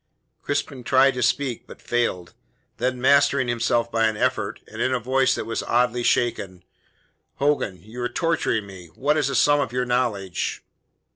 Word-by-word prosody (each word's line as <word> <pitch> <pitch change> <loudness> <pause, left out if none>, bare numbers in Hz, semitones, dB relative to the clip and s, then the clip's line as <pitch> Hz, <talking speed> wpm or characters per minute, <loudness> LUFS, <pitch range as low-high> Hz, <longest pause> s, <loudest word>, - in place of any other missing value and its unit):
Crispin 145 -2 -3
tried 135 +2 +4
to 125 - -4
speak, 125 0 0
but - - -12
failed. 90 -8 -2 0.4
Then, 125 +1 -1
mastering 140 0 +3
himself 120 0 0
by 115 0 +2
an 110 -1 -2
effort, 125 -4 -1
and 110 +2 -8
in 130 - +1
a - - -1
voice 130 +2 +2
that - - -4
was 115 - -3
oddly 125 0 +1
shaken: 100 -7 0 0.7
"Hogan," 140 -8 0
he 90 - -20
cried, 105 +4 -17
"you 125 +1 -6
are 120 - -1
torturing 125 - 0
me! 95 -3 -11
What 145 +3 +1
is 150 -3 +1
the 140 - -2
sum 145 +2 +4
of 135 -5 -1
your 125 0 -1
knowledge?" 115 -7 -2
120 Hz, 185 wpm, -23 LUFS, 110-135 Hz, 0.7 s, tried